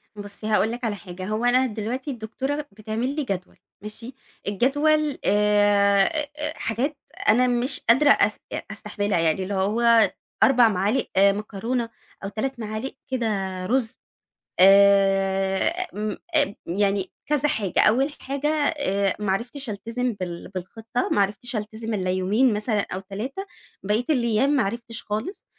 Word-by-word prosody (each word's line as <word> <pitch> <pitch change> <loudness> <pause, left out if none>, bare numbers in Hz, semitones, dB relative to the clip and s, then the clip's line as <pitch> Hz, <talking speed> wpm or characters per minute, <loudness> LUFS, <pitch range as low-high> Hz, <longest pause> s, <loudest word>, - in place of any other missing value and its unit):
بُصّي، 205 +1 -8
هاقول 215 0 +2
لِك 240 +2 -6
على 220 -3 -1
حاجة، 185 -2 -8
هو 215 +3 -1
أنا 250 +2 +4
دلوقتي 245 +5 -4
الدكتورة 270 +5 -4
بتعمل 220 +6 -3
لي 300 - -1
جدول، 195 -7 -5 0.2
ماشي؟ 225 +4 -9 0.3
الجدول 290 +8 +2
آآ 205 -1 +4 0.5
حاجات 260 +7 -2 0.3
أنا 250 +3 +5
مش 250 +3 0
قادرة 265 +5 +6
أس - - +4 0.3
أستحملها، 205 -3 -2
يعني 165 +3 +1
اللي 200 - -4
هو 220 +2 +3 0.3
4 250 -3 +6
معالق 205 +6 0
مكرونة 210 +4 +1 0.3
أو 195 - -3
3 250 +5 -3
معالق 215 +3 -5 0.2
كده 245 -3 0 0.4
رز. 235 +2 -1 0.6
آآ 195 - +4
م 210 0 -3 0.2
آآ 205 -9 +2
يعني 195 +1 0
كذا 295 -1 +1
حاجة، 200 - 0
أول 265 +7 +3
حاجة 280 +2 -2 0.3
آآ 200 -7 0
ما 195 -2 +1
عرفتش 245 +5 -4
ألتزم 230 +4 -3
بال 180 -4 -6
بالخطة، 225 +6 -3
ما - - +2
عرِفتش 210 +5 -1
ألتزم 220 +1 -4
إلا 185 -3 -1
يومين 205 +7 +2
مثلًا 210 0 0
أو 185 - -3
3، 220 - -6 0.4
بقية 210 +4 0
الأيام 245 -1 +2
ما 290 -3 +3
عرِفتش 230 +3 -5
خالص، 220 - -4
220 Hz, 140 wpm, -24 LUFS, 200-250 Hz, 0.6 s, قادرة